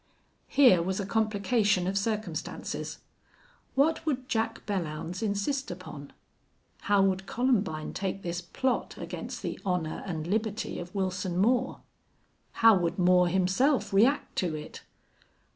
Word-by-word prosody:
Here 255 -11 +6
was 190 +3 -2
a 200 - -2
complication 210 -2 +1
of 190 +2 -1
circumstances. 200 -4 -3 0.7
What 315 +4 +2
would 265 -5 -2
Jack 225 -1 -1
Belllounds 175 -2 -3
insist 220 +6 -1
upon? 160 -6 -8 0.7
How 205 -1 +3
would 195 0 0
Columbine 215 -11 0
take 195 0 -3
this 175 0 -3
plot 250 +9 -2
against - - -6
the - - -4
honor 180 -5 -1
and 160 -4 -3
liberty 215 +3 -2
of 175 +3 -8
Wilson 185 -2 -1
Moore? 245 +6 +2 0.8
How 225 -2 +9
would 170 -2 -1
Moore 180 -1 +5
himself 190 - +2
react 235 +9 +3
to 170 -4 0
it? 150 0 -8
195 Hz, 125 wpm, -29 LUFS, 180-225 Hz, 0.8 s, How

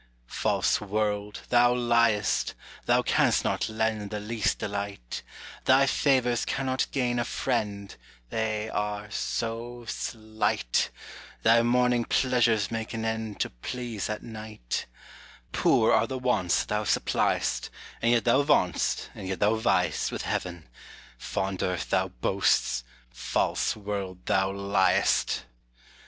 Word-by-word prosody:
False - - +1
world, 105 0 -2
thou 120 0 +5
ly'st: 115 -4 +2 0.3
thou - - +4
canst - - +3
not - - 0
lend 110 -2 -1
The 105 - -4
least 110 +1 -1
delight: 100 -11 -4 0.4
Thy 130 +1 +6
favors 130 -3 +2
cannot 130 -1 -1
gain 120 -2 0
a - - +1
friend, 105 -6 -2 0.4
They 110 -1 -1
are 105 0 -3
so 120 +2 -3
slight: 110 - -1 0.5
Thy 115 +1 +6
morning 125 0 +2
pleasures 120 -5 +2
make 115 0 -4
an 110 0 -3
end 110 -2 -3
To - - -1
please 115 - -5
at 105 - -4
night: 110 - -5 0.6
Poor - - +3
are - - +3
the 130 - -4
wants 115 -9 +1
that - - -19
thou 105 0 0
supply'st, - - 0 0.3
And 115 - +3
yet 120 0 +2
thou 125 +3 +5
vaunt'st, 140 - +1
and 95 - -7
yet 95 0 -3
thou 105 +1 +3
vy'st 90 -7 +1
With - - -4
heaven: 90 -4 -3 0.5
fond 95 -1 -3
earth, 90 -2 -2
thou - - +2
boasts; 60 0 +1 0.3
false - - 0
world, 100 -3 -5
thou 95 0 +2
ly'st. 100 -9 +2
110 Hz, 130 wpm, -27 LUFS, 100-120 Hz, 0.6 s, Thy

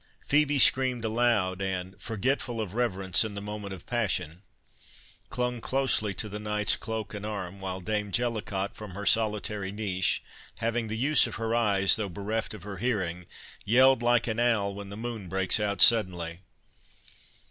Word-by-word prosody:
Phœbe 145 -1 +3
screamed 125 -2 +4
aloud, 110 -5 +1
and, 95 -1 -3
forgetful 120 +1 -2
of 105 -4 -4
reverence 95 -6 +1
in 110 -2 -5
the - - -4
moment 105 -1 -7
of 95 -3 -9
passion, 90 -8 -2 0.9
clung 125 -1 -2
close 135 -1 +1
to 105 -1 -3
the 105 0 -6
knight's 105 0 +1
cloak 110 -2 -5
and 105 -1 -7
arm, 100 -3 -5
while 95 0 -5
Dame 105 +2 -2
Jellicot, 105 -4 -2
from 105 -4 -10
her 100 +1 -6
solitary 105 -3 +1
niche, 100 -3 -1 0.3
having 115 0 -1
the 110 +1 -4
use 140 +3 +3
of 115 - -7
her 115 0 -2
eyes, 100 -4 +5
though 105 -3 -3
bereft 105 +5 -4
of - - -12
her 100 -1 -7
hearing, 90 -6 -2 0.4
yelled 130 +3 +4
like 120 0 +2
an 110 -1 -2
owl 110 -5 +1
when 100 0 -8
the 100 - -8
moon 115 -5 -6
breaks 95 +2 +1
out 100 -1 +4
suddenly. 90 -7 +4
105 Hz, 165 wpm, -27 LUFS, 95-115 Hz, 0.9 s, eyes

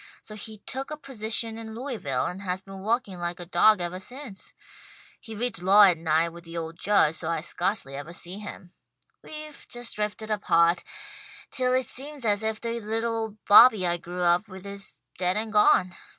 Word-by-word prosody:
So 215 - -9
he 215 +1 -6
took 270 +1 -4
a 305 - -5
position 225 -4 -3
in 220 -1 -8
Louisville, 250 -1 -2
and 180 +2 -4
has 185 -1 -3
been 195 0 -10
working 210 -2 -1
like 175 0 -3
a 175 - -6
dawg 215 +4 +5
evah 175 +1 -3
since. 245 -1 -9 0.7
He 225 -2 -9
reads 225 -3 -2
law 195 +3 +7
at 180 -5 +5
night 160 +1 +2
with 170 +1 -12
the 165 0 -8
old 165 0 -5
Judge, 195 -6 +3
so 160 - -4
I 165 -2 -1
scarcely 175 -3 -2
evah 145 +4 -7
see 180 +4 -7
him. 185 -4 -10 0.5
We've 305 -1 -9
just 240 -1 -3
drifted 210 +1 -3
apart, 170 -4 +3 0.7
till 255 -1 +1
it 260 0 +1
seems 275 +2 -4
as 205 -1 +2
if 220 0 -2
the 235 0 -3
little 225 +1 -2
old 220 -2 -5
Bobby 215 -2 +8
I 175 0 +1
grew 175 +1 -5
up 175 +5 +3
with 190 -1 -11
is 200 0 -4 0.2
dead 180 +1 +1
and 220 0 -3
gone. 185 -3 +5
205 Hz, 195 wpm, -26 LUFS, 175-225 Hz, 0.7 s, Bobby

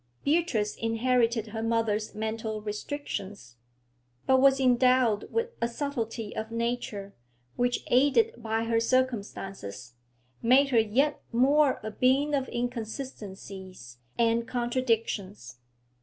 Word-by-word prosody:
Beatrice 285 -10 +1
inherited 230 -1 +1
her 220 +1 -4
mother's 225 -2 0
mental 220 0 -3
restrictions, 210 - -6 0.7
but 260 0 +4
was 270 0 +5
endowed 250 -4 +3
with 460 +1 0
a 235 - +2
subtlety 235 -4 -4
of 220 0 -4
nature, 230 -4 -3 0.4
which, 245 0 0
aided 285 - +3
by 225 0 -1
her 230 0 +1
circumstances, 200 - -2 0.5
made 265 +4 +5
her 240 -4 +4
yet 255 +7 +1
more 275 +4 +3
a 215 - -4
being 265 +6 +2
of 270 -2 0
inconsistencies 200 - -6 0.2
and 230 0 +2
contradictions. 230 - -2
230 Hz, 110 wpm, -28 LUFS, 215-255 Hz, 0.7 s, was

